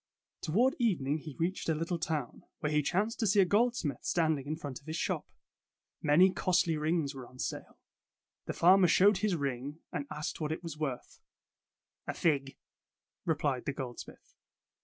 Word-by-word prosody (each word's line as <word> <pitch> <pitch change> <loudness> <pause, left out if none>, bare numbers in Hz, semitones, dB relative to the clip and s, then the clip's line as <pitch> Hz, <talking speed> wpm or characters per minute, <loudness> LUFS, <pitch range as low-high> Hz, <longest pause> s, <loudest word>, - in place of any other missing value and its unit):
Toward 240 - +2
evening 160 - +1
he 150 -2 -9
reached 175 +1 -1
a 160 - +2
little 165 +2 -2
town, 155 -7 -3 0.2
where 150 - -1
he 150 0 +3
chanced 200 +9 0
to 220 - +2
see 200 +2 +4
a 195 - +7
goldsmith 210 - +1
stand 160 -3 +1
ing 135 - -9
in 155 - -1
front 145 -5 -7
of 140 - -24
his 160 - -3
shop. 165 - -2 0.7
Many 170 +6 +5
costly 175 -2 +2
rings 155 -1 0
were 130 -3 -8
on 130 - -17
sale. - - -5 0.7
The - - -2
farmer 185 +1 +6
showed 195 +4 +5
his 210 -4 +1
ring 140 0 -3
and 140 -1 -4
asked 150 +2 -4
what 155 0 -1
it 160 - -4
was 165 -3 -5
worth. 145 -5 -4 0.9
''A - - -3
fig," 140 -5 0 0.7
replied 145 -5 0
the 140 - -1
goldsmith. 125 -3 -8
160 Hz, 175 wpm, -31 LUFS, 145-180 Hz, 0.9 s, a